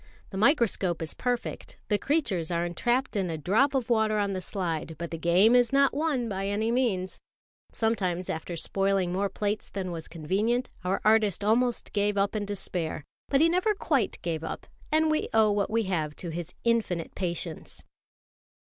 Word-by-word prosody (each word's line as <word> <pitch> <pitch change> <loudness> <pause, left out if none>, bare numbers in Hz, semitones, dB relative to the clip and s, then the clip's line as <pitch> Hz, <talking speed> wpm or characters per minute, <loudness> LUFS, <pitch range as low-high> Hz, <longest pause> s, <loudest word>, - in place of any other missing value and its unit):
The 190 - -5
microscope 215 - +2
is 160 - -2
perfect, 245 -1 -3
the 210 -2 +1
creatures 215 - 0
are 170 0 0
entrapped 240 +9 0
in 190 -3 0
a 160 - -3
drop 225 - +2
of 250 -2 0
water 220 -2 +3
on 200 -1 0
the 185 - -3
slide; 165 -4 -3
but 170 0 -5
the 165 - -3
game 185 +8 +5
is 245 0 +4
not 275 0 +4
won 285 -5 0
by 195 -2 -2
any 215 +3 0
means. 215 -7 0 0.5
Sometimes, 185 -6 0
after 160 +2 -4
spoiling 195 +1 0
more 195 +2 0
plates 205 +1 -2
than 190 -2 -4
was 165 -2 -6
convenient, 200 +10 -1
our 185 +2 0
artist 215 -3 +3
almost 235 +3 +1
gave 205 0 +1
up 200 +2 +1
in 210 -1 -1
despair; 180 -6 -3 0.2
but 275 0 +3
he 325 - +6
never 365 +5 +2
quite 280 - 0
gave 165 -2 -2
up, - - -5 0.3
and 315 0 +3
we 310 - 0
owe 220 -1 +5
what 205 -1 0
we 225 +1 +1
have 160 -6 -2
to 175 - -6
his 170 0 -6
infinite 225 -8 0
patience. 170 -3 -4
205 Hz, 180 wpm, -28 LUFS, 175-235 Hz, 0.5 s, he